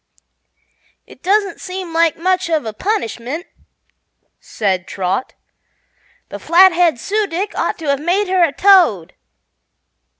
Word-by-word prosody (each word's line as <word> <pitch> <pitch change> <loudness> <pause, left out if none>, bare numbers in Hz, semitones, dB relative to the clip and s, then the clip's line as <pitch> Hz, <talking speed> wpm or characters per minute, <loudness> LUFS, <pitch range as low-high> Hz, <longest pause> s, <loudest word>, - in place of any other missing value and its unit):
"It - - -17
doesn't 395 0 0
seem 365 -2 -7
like 330 -1 +2
much 365 +1 0
of 315 -6 0
a 220 - -5
punishment," 300 - -4 0.9
said 190 -4 -3
Trot. 190 +5 -3 0.9
"The - - -8
Flathead 345 -5 +4
Su 420 - -1
dic 380 +4 -4
ought - - -2
to 325 - -9
have 280 0 0
made 375 +5 0
her 370 -1 +2
a 330 - +2
toad." 335 - +3
340 Hz, 125 wpm, -17 LUFS, 265-375 Hz, 0.9 s, Flathead